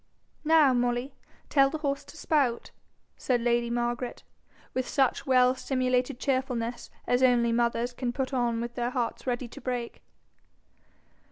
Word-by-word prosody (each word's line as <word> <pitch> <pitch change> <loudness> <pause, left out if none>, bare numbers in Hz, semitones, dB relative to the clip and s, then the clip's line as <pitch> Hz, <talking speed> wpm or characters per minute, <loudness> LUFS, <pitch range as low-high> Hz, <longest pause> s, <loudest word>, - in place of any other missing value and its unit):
'Now, 310 -4 +5
Molly, 245 +2 0 0.3
tell 275 -2 +4
the 315 - -4
horse 280 -2 -2
to - - -13
spout,' 275 -7 0 0.5
said 250 -2 0
lady 235 0 +1
Margaret, 240 +1 -2 0.5
with 255 -1 -2
such 270 -1 +1
well 255 -1 +5
simulated 255 0 -1
cheerfulness 255 -4 -2 0.2
as 245 +1 +1
only 240 -2 +4
mothers 235 +1 0
can 245 0 -2
put 265 +2 -3
on 240 -2 0
with 235 0 -5
hearts 245 +1 -2
ready 245 0 -1
to - - -11
break. 245 -1 -4
250 Hz, 140 wpm, -28 LUFS, 240-265 Hz, 0.5 s, Now